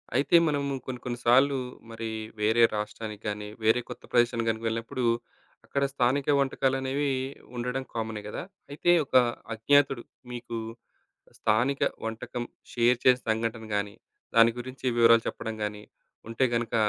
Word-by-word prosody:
అయితే 140 +6 +3
మనము 140 -2 0
కొన్ని, 125 -2 -5
కొన్ని 120 -1 -4
సార్లు 135 +3 +5 0.3
మరి 115 0 -5 0.3
వేరే 110 +2 +4
రాష్ట్రానికి 105 0 -5
గాని, 105 0 -3 0.2
వేరే 110 +3 +4
కొత్త - - -8
ప్రదేశానికి 120 -1 +2
గనక 110 0 -2
వెళ్ళినప్పుడు, 115 +2 -3 0.6
అక్కడ 140 - -1
స్థానిక 135 +1 +1
వంటకాలనేవి 135 +1 0 0.5
ఉండడం 125 +2 -2
కామనే 110 -2 -3
గదా! 105 - -5 0.3
అయితే, 155 +4 +2
ఒక 130 - -6 0.4
అజ్ఞాతుడు 135 +2 +3 0.3
మీకు 120 -1 -5 0.8
స్థానిక 120 +6 +1 0.2
వంటకం 115 +2 -4 0.3
షేర్ 120 0 +3
చేసిన 125 -1 +5
సంఘటన 110 0 -2
గాని, 100 0 -2 0.4
దాని 115 0 +7
గురించి 130 +2 -8
వివరాలు 115 -1 +6
చెప్పడం 110 -1 -4
గాని, 105 0 -6 0.5
ఉంటే 115 +3 +1
గనుక 115 -1 -2
120 Hz, 130 wpm, -28 LUFS, 110-130 Hz, 0.8 s, దాని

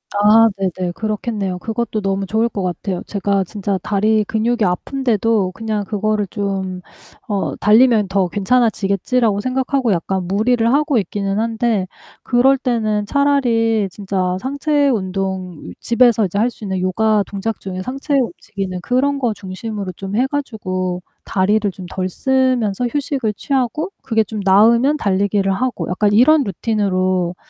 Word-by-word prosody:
아 215 +2 +6
네네. 185 -2 -2
그렇겠네요. 210 -3 -3
그것도 225 +1 -3
너무 195 -1 -1
좋을 220 +4 +1
것 205 -4 -4
같아요. 180 +1 -3
제가 200 -1 0
진짜 200 0 -3
다리 215 +1 +2
근육이 225 +2 0
아픈데도 220 0 0
그냥 215 +1 -3
그거를 210 0 -1
좀 190 -3 -3 0.5
어 200 -2 -1
'달리면 220 -1 +4
더 190 -2 +1
괜찮아지겠지.'라고 210 0 +1
생각하고 255 -1 0
약간 185 +1 -1
무리를 225 +4 +1
하고 290 -2 +2
있기는 200 0 -1
한데 225 -3 0 0.4
그럴 265 +2 +3
때는 215 -5 -1
차라리 230 -6 +2
진짜 185 -2 -2
상체 285 +3 0
운동 190 -4 -2
이 90 - -8
집에서 235 -2 +3
이제 190 +2 -3
할 230 +3 +3
수 230 - -14
있는 190 -2 -2
요가 210 +3 +2
동작 205 +2 -4
중에 185 -1 -5
상체 275 +6 -4
움직이는 200 - -3
그런 275 +5 +1
거 240 -4 0
중심으로 200 0 -6
좀 195 +1 -5
해 250 +4 +3
가지고 185 -10 -3 0.2
다리를 205 +2 +1
좀 185 0 -10
덜 185 0 -2
쓰면서 255 -2 +1
휴식을 270 -4 -2
취하고 270 - -1
그게 225 -3 +1
좀 215 0 -6
나으면 235 +9 +5
달리기를 200 -2 +1
하고 255 +4 -2
약간 205 +3 +1
이런 285 +7 +5
루틴으로 185 -4 0
210 Hz, 325 characters per minute, -18 LUFS, 195-240 Hz, 0.5 s, 아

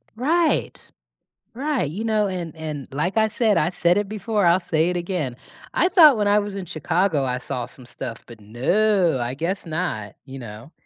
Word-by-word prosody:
Right, 315 +7 +1 0.8
right, 270 - -1
you 200 +8 -5
know, 215 -2 +2
and 175 -4 -5
and 155 -3 -5
like 165 +9 -1
I 220 0 +4
said, 215 -1 +1
I 155 - +2
said 175 0 +2
it 205 -1 -2
before, 210 -1 -1
I'll 170 +2 +4
say 160 -2 +1
it 180 - -1
again, 170 -8 -3 0.4
I 360 - +3
thought 310 - +7
when 210 -1 +1
I 205 +1 +5
was 205 -1 -3
in 195 - -4
Chicago, 165 -1 0
I 125 -1 -1
saw 125 -1 -4
some 130 - -14
stuff, 115 -1 -7
but 115 -2 -13
no, 170 - +1
I 120 +1 -2
guess 170 +7 -3
not, 155 - -3
you 135 0 -9
know? 115 +4 -10
175 Hz, 195 wpm, -23 LUFS, 140-210 Hz, 0.8 s, thought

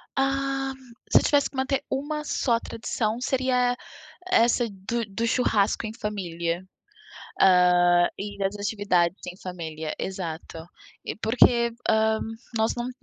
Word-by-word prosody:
Ah, 270 0 0 0.4
se - - +7
eu - - -3
tivesse 285 -1 +3
que 275 - -17
manter 265 +1 0
uma 300 +3 -2
só 235 -5 +1
tradição 225 -1 -3
seria 250 -1 +1 0.6
essa 235 -2 +4
do 205 +4 -3
do 210 +3 -2
churrasco 220 -3 +1
em 215 - -6
família, 175 -5 -3 0.8
ah, 180 -1 +5
e 205 0 -5
das 195 +1 -1
atividades 200 -4 +1
em 180 - -7
família, 160 -4 -5
exato. 165 -3 -5 0.4
E - - -4
porque, 235 +1 +3 0.2
ah, 220 0 +3 0.4
nós 220 +1 +2
não 240 +1 -3
220 Hz, 130 wpm, -25 LUFS, 185-250 Hz, 0.8 s, se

